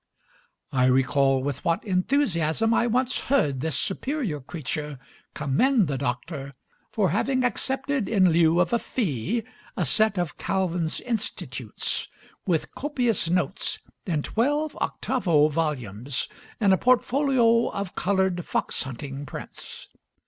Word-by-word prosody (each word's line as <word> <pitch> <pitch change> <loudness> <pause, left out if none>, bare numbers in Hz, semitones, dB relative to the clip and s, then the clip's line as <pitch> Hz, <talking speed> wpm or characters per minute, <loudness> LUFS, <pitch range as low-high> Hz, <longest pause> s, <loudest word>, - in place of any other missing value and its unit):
I 130 -1 +3
recall 135 +1 +3
with 140 -1 -3
what 170 +2 +1
enthusiasm 190 - +1
I 235 - +3
once 250 +2 +1
heard 150 - +1
this 160 +1 0
superior 230 - -2
creature 150 0 -4 0.4
commend 220 - +2
the 135 -2 -2
doctor 135 +2 -4 0.3
for 195 -7 +1
having 260 +6 +1
accepted 265 -1 -1
in 190 -5 +4
lieu 165 +1 +4
of 180 +5 +2
a 235 - +3
fee 210 - -2 0.3
a 180 - +1
set 215 +8 +3
of 175 -4 -2
Calvin's 180 -4 0
"Institutes," 230 -3 -2 0.4
with 170 -4 0
copious 245 - 0
notes, 180 +2 0 0.3
in 155 -5 0
twelve 290 +6 0
octavo 170 - +2
volumes, 135 -6 -2 0.3
and 200 -3 +4
a - - +4
portfolio 250 -1 +3
of 200 -2 -4
colored 190 -2 +1
fox - - 0
hunting 135 +2 -6
prints. - - -8
180 Hz, 125 wpm, -25 LUFS, 145-235 Hz, 0.4 s, in